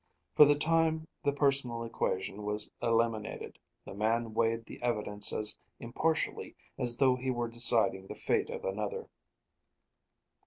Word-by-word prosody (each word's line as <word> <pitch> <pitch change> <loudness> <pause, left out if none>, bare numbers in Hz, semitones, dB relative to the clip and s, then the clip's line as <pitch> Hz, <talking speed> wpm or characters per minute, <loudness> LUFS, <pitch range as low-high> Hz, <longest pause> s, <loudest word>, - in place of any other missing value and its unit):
For 150 - +8
the 145 0 +4
time 160 +1 +1 0.2
the 145 - +2
personal 140 -5 0
equation 100 -3 -3
was 105 0 0
eliminated; 115 -2 -1 0.3
the - - -9
man 110 +2 -1
weighed 115 0 0
the - - -11
evidence 105 -4 +1
as 105 0 -1 0.2
impartially 155 +7 -2 0.2
as 120 -1 +1
though 130 -1 +4
he 130 +1 -4
were 120 -2 -1
deciding 115 -5 +2
the - - -7
fate 455 -1 0
of 480 0 -6
another. 470 -2 -4
120 Hz, 140 wpm, -31 LUFS, 110-145 Hz, 0.3 s, For